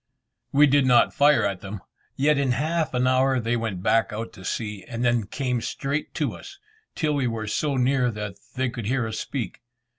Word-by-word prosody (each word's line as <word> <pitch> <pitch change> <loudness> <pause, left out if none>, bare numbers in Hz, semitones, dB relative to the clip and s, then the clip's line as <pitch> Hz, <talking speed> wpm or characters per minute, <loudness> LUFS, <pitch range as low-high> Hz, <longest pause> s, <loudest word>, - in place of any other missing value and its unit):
We 145 +2 +6
did 140 -1 +3
not 120 -2 +5
fire 145 -3 +4
at 100 -2 -2
them, 100 0 -7 0.3
yet 145 +1 +3
in 135 -3 +2
half 155 +3 -1
an 125 0 +2
hour 130 0 +3
they 115 +1 0
went 110 -6 -3
back 115 -1 +2
out 110 +2 -5
to 95 - -12
sea, 105 0 -4
and 120 0 -3
then 120 -4 +2
came 125 0 -2
straight 140 +5 -3
to - - -1
us, 390 -1 -11 0.4
till 155 -2 0
we 140 -3 +1
were 115 -2 -3
so 140 +6 -1
near 130 0 +2
that 105 -3 -5 0.2
they 130 0 0
could 115 -4 -5
hear 125 0 +1
us 110 -1 -4
speak. 130 -5 -4
125 Hz, 205 wpm, -25 LUFS, 110-140 Hz, 0.4 s, We